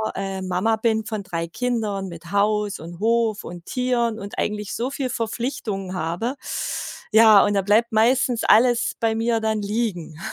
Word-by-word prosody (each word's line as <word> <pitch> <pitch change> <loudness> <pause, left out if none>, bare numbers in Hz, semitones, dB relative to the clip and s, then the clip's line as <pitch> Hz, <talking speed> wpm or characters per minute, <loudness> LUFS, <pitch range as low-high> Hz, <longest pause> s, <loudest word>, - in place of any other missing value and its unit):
äh, 195 -1 -4
Mama 185 +5 +1
bin 220 -1 0
von 215 -2 -4
3 170 -3 -4
Kindern 215 -3 -2
mit 170 +1 -10
Haus 205 0 +1
und 170 +2 -9
Hof 225 -1 +1
und 175 0 -9
Tieren 240 -3 0
und 200 -1 -7
eigentlich 210 -2 -2
so 245 +3 -2
viel 275 -2 -3
Verpflichtungen 220 -5 -3
habe. 180 +9 -2 0.8
Ja, 220 -2 +7
und 205 - +1
da 195 - +2
bleibt 210 +4 +2
meistens 240 +2 +2
alles 240 +2 +4
bei 225 -1 +1
mir 230 +1 +1
dann 220 -1 -1
liegen. 200 -7 -3
215 Hz, 165 wpm, -23 LUFS, 195-230 Hz, 0.8 s, Ja